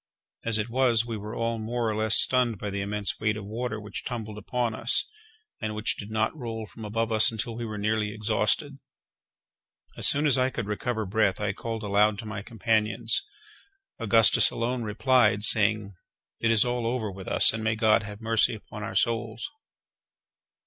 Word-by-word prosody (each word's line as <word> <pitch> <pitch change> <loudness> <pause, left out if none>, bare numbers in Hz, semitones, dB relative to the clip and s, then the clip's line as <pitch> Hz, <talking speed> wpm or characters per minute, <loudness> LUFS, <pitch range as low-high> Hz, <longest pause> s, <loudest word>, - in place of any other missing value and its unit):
As 115 -1 +1
it 105 0 -2
was, 120 -3 +2
we 115 -1 -5
were 105 +1 -7
all 115 0 -2
more 115 +2 -3
or 110 - -1
less 110 +1 +2
stunned 125 -4 +3
by 105 +1 -5
the 100 0 -3
immense 100 0 -3
weight 105 -1 -1
of 105 - -8
water 110 +1 -4
which 105 0 -6
tumbled 110 -4 -6
upon 120 +2 -2
us, 115 +2 +3 0.5
and 110 -1 -4
which 105 +2 -1
did 100 - -9
not 110 +5 -1
roll 115 -5 -6
from 110 +3 -12
above 115 +2 -2
us 110 0 +4
until 115 +1 -5
we 120 0 -5
were 110 -2 -6
nearly 105 0 -1
exhausted. 110 +6 -1 1.2
As - - +4
soon 145 +2 +4
as 135 -3 +4
I 130 0 +2
could 120 -4 -5
recover 110 +2 -3
breath, 100 -1 0
I 105 -1 -2
called 115 +1 -6
aloud 105 +1 +2
to 110 - -8
my 110 -1 -6
companions. 110 0 0 0.8
Augustus 115 -2 +5
alone 120 +2 -3
replied, 110 -1 +2
saying: 105 -1 +4 0.5
"It 115 - 0
is 115 +1 +4
all 120 -1 -2
over 115 -4 -2
with 95 0 -11
us, - - +4
and 110 0 -5
may 110 0 0
God 110 0 +3
have 105 0 -10
mercy 115 0 +2
upon 110 0 -11
our 110 +2 -6
souls!" 115 -1 -1
110 Hz, 185 wpm, -26 LUFS, 105-115 Hz, 1.2 s, Augustus